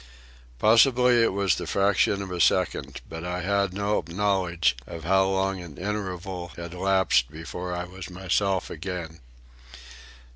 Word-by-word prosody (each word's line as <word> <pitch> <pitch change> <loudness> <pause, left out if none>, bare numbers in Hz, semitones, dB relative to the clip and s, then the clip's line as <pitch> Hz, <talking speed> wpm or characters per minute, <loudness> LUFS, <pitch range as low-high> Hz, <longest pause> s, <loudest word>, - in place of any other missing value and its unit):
Possibly 120 - +5
it 115 - +3
was 100 -1 +1
the - - -4
fraction 100 0 +2
of 95 - -8
a 90 -1 -2
second, 70 -2 +1
but 80 +1 -7
I 90 +1 -3
had 100 +1 +1
no 100 +2 -1
knowledge 90 -6 +1
of 85 -1 -8
how 95 +3 +3
long 95 -1 0
an 85 -5 -11
interval 95 -3 -4
had 85 0 -7
lapsed 95 -9 +2
before 85 +3 -6
I 90 - -3
was 90 +1 -9
myself 95 +1 -1
again. 85 -1 -6
95 Hz, 145 wpm, -26 LUFS, 85-100 Hz, -, Possibly